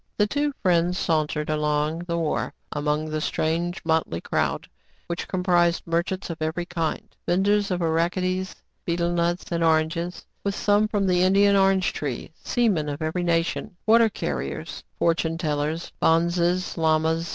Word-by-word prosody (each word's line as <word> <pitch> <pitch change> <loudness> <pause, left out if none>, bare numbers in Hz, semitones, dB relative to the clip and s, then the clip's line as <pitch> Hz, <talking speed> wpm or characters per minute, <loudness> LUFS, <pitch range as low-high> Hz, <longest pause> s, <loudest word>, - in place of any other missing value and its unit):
The 210 - +4
two 290 +7 0
friends 175 -1 +2
sauntered 155 -3 0
along 150 +1 0
the 170 -1 -1
wharf 160 -2 -1 0.2
among 150 +1 -1
the 155 0 -2
strange, 170 +4 -1
motley 160 - +1
crowd, - - -1 0.4
which 170 0 -4
comprised 175 -2 +2
merchants 170 +2 -1
of 165 - -8
every 160 +3 -2
kind; 165 -3 -3
venders 200 +3 +2
of 180 -2 -1
arachides, 180 +3 0 0.3
betel 170 0 0
nuts, 175 0 0
and 170 -1 0
oranges, 165 +2 0 0.2
with 200 -1 -1
some 205 +1 +3
from 205 -2 0
the 180 -1 +3
Indian 200 +2 +4
orange 195 -1 +3
tree; 140 -2 -4
seamen 195 -11 +1
of 145 +2 -4
every 160 +3 -1
nation, 170 +3 -1
water 225 +1 +5
car - - -3
riers, - - -5 0.2
fortune 165 -1 +1
tellers, 155 0 -2
bonzes, 170 +2 +2
lamas. 160 +1 +1
170 Hz, 150 wpm, -24 LUFS, 160-185 Hz, 0.4 s, water